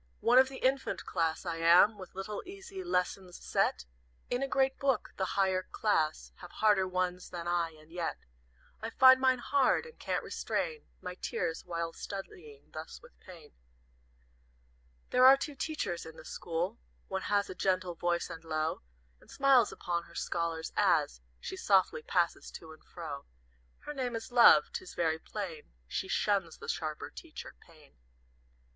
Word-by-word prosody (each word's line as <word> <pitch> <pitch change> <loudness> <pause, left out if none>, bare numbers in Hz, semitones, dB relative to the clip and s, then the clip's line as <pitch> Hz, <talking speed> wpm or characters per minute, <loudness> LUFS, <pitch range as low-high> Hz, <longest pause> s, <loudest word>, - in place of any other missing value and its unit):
"One 245 +2 +6
of 260 0 +5
the 265 - -8
infant 265 +1 0
class 165 0 -1
I 170 -2 -2
am 170 +6 +6
With 185 -3 -11
little, 195 +2 -4
easy 385 0 -8
lessons, 180 - -1
set - - 0 0.5
In 245 +1 0
a 275 - 0
great 265 0 +1
book; 275 -2 0
the 190 0 -3
higher 190 -1 +3
class 160 -6 0
Have 180 - -11
harder 205 -3 +3
ones 180 0 -2
than 175 -1 -6
I, 175 -1 +1
and 155 +1 -19
yet 170 -1 -3 0.6
I 225 - -3
find 260 +2 +7
mine 260 -1 +4
hard, 270 - +2
and 475 - -14
can't - - -2
restrain 465 -2 -3 0.2
My 180 - -4
tears 165 -2 -3
while 170 -1 -3
studying 160 -7 -9
thus 155 +1 -7
with 240 - -18
Pain. 170 -6 -14 1.6
"There 250 - +4
are 265 +1 +9
two 295 +2 -4
Teachers 275 - -3
in 160 0 -10
the - - -12
school, 175 +6 -3 0.3
One 190 0 -3
has 205 -1 +2
a - - -6
gentle 185 -1 0
voice 170 0 -1
and 165 - -9
low, 155 -1 -2 0.4
And - - -22
smiles 270 -5 +4
upon 170 -1 -3
her - - -17
scholars, 165 -1 -2
as 60 +1 +2 0.2
She 190 - -6
softly 190 -4 +2
passes 170 +1 0
to 160 - -10
and 155 - -18
fro. 150 -5 -7 0.6
Her 295 - -6
name 250 -4 -2
is 225 +1 -6
Love; 240 -1 +7
'tis 370 - -6
very 160 -1 +1
plain 170 - -7
She 190 - -3
shuns 195 -5 0
the - - -10
sharper 155 -2 -3
teacher, 320 - -9
Pain. 155 -4 -20
185 Hz, 165 wpm, -31 LUFS, 165-245 Hz, 1.6 s, are